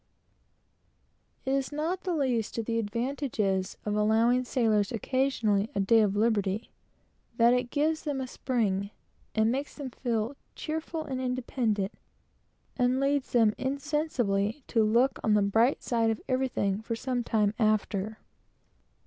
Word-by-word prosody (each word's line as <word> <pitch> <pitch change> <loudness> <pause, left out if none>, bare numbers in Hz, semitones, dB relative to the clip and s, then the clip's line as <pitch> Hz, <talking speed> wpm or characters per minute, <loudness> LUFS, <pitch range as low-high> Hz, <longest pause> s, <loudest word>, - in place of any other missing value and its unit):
It 265 - 0
is 275 0 0
not 330 +6 -2
the 360 -2 0
least 250 -8 0
of 230 - -2
the 230 0 0
advantages 225 -4 -1
of 210 0 -1
allowing 225 +4 +3
sailors 220 -5 +1
occasionally 230 -4 +1
a - - 0
day 210 +4 +4
of 205 -2 +1
liberty, 210 -1 0 0.7
that 235 +1 +6
it 250 0 0
gives 310 +3 +1
them 290 -3 -2
a 260 - -2
spring, 210 -7 -1 0.5
and 220 +1 +3
makes 275 +3 -3
them 275 -4 -6
feel 235 +1 -2 0.2
cheerful 320 +1 -4
and 260 -2 -3
independent, 240 -5 -1 0.8
and 250 0 +2
leads 275 0 0
them 225 -3 +4
insensibly 265 -5 -1
to 225 -2 +3
look 235 +5 +2
on 215 -1 +3
the 205 - +4
bright 225 +7 +2
side 230 -2 +1
of 220 - -1
everything 255 -6 0
for 230 +1 -3
some 245 +1 -2
time 210 -3 +1
after. 215 -1 0
235 Hz, 140 wpm, -28 LUFS, 215-265 Hz, 0.8 s, that